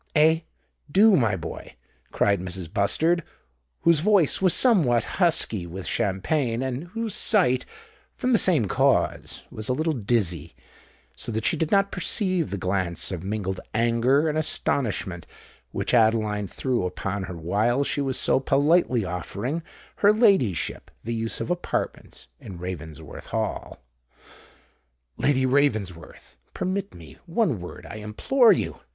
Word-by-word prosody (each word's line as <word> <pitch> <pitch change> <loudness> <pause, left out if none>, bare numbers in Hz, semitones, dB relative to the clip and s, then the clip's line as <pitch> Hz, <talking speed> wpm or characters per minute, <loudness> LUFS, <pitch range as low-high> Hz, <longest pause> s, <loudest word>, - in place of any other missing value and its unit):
"Eh—do, 160 +5 +2
my 115 - +2
boy," 85 -3 -8 0.4
cried 100 -2 +2
Mrs. 90 -2 -6
Bustard, 160 +12 +1 0.6
whose 170 -3 +4
voice 190 -3 +3
was 185 -2 +4
somewhat 165 - +4 0.2
husky 115 - +2
with 90 +2 -7
champagne, 115 +4 -1
and 130 +4 -4
whose 220 +3 -4
sight, 150 - +3 0.4
from 255 0 -1
the 225 - +5
same 160 - +4
cause, 95 - 0
was 110 +1 -4
a - - +2
little 155 +4 0
dizzy—so 90 - -4
that 110 0 -3
she - - +3
did 160 0 -1
not 200 0 +2
perceive 185 -2 0
the 100 - -3
glance 90 -2 -1
of 90 -3 -4
mingled 95 -2 -3 0.2
anger 120 +6 +2
and 155 0 0
astonishment 105 - -2 0.4
which - - -3
Adeline 110 -3 +2
threw 125 +1 -2
upon 95 +2 -4
her 90 -2 -7
while 105 - +1
she 145 - -1
was 135 -2 -1
so - - +2
politely 135 - +2
offering 100 - -4 0.4
her 205 - +5
ladyship 195 - +1
the 115 - -3
use 115 0 -2
of - - -3
apartments 175 - -4
in 95 -5 -10
Ravensworth 85 -4 -8
Hall. - - -3 1.4
"Lady 130 -2 +2
Ravensworth, 105 - -1 0.2
permit 185 - -3
me—one 150 - -3
word, 90 - -9
I - - -8
implore 220 - +3
you!" - - -1
120 Hz, 135 wpm, -24 LUFS, 95-160 Hz, 1.4 s, the